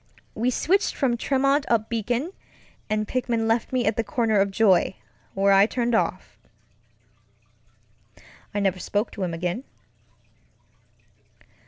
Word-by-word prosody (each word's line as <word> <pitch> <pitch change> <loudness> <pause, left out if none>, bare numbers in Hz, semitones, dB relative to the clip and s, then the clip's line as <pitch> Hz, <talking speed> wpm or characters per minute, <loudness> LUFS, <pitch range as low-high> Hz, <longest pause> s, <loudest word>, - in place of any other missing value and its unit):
We 235 +3 0
switched 380 - +1
from 255 -4 +1
Tremont 275 +3 +1
up 225 -2 +2
Beacon, 240 - -2 0.6
and 215 0 -1
Pickman 240 -3 -1
left 225 0 0
me 255 -2 0
at 215 - +1
the 230 - +1
corner 225 -2 +1
of 200 0 +2
Joy, 195 -2 +3 0.4
where 195 0 +4
I 195 +1 +6
turned 240 0 -1
off. 225 - -1 2.1
I 205 - -2
never 190 -2 0
spoke 205 +4 -2
to 200 - -8
him 170 -2 -2
again. 180 +8 -3
225 Hz, 130 wpm, -24 LUFS, 200-250 Hz, 2.1 s, I